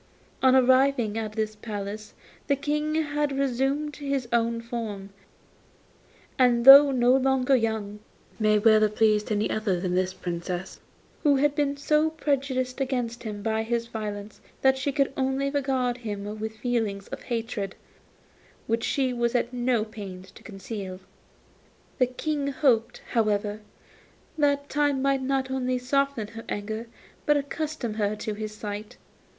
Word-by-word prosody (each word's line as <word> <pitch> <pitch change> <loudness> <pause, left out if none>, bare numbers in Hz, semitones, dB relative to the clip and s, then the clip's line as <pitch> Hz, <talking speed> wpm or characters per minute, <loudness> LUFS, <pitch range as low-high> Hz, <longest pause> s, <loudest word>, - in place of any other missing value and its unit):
On 260 0 +5
arriving 260 -3 +4
at 220 -2 -3
this 215 -1 -2
palace 210 -1 -6 0.3
the 280 - +3
King 300 +2 -1
had 295 -2 0
resumed 275 +3 0
his 275 -3 -2
own 230 0 +1
form, 225 -4 -5 1.3
and 245 -2 +4
though 280 +1 +11
no 250 -1 +4
longer 265 0 +3
young, 220 -3 -1 0.4
he - - -2
might 215 0 +3
well 215 -1 +7
have 210 0 +2
pleased 215 -1 +2
any 210 0 +1
other 210 -5 0
than 180 0 -2
this 185 0 +1
Princess, 175 0 -5 0.4
who 290 -3 +4
had 285 +1 +2
been 285 -1 0
so 300 +2 +2
prejudiced 270 -4 -1
against 245 -3 -2
him 210 -3 -6
by 220 0 0
his 230 +1 -1
violence 210 -2 -6 0.2
that 265 0 +5
she 265 +2 -1
could 275 -1 0
only 270 +1 0
regard 260 -3 0
him 210 -2 -5
with 220 0 -4
feelings 220 -4 -2
of - - -6
hatred, 225 -5 -3 0.9
which 230 0 -1
she 260 -3 0
was 235 0 0
at 245 0 0
no 240 -3 +1
pains 190 -4 -9
to - - -16
conceal. 195 -2 -7 1.0
The 255 - +4
King 285 +3 -2
hoped, 265 -6 +1
however, 210 -2 0 0.8
that 285 -2 +1
time 290 -2 +1
might 275 0 +1
not 265 0 -1
only 255 -1 0
soften 255 -3 0
her 225 0 -9
anger, 220 +3 -4 0.4
but 295 0 +5
accustom 285 -4 -3
her 210 -1 -1
to 215 0 -4
his 215 0 -5
sight. 210 0 -7
240 Hz, 150 wpm, -26 LUFS, 215-275 Hz, 1.3 s, though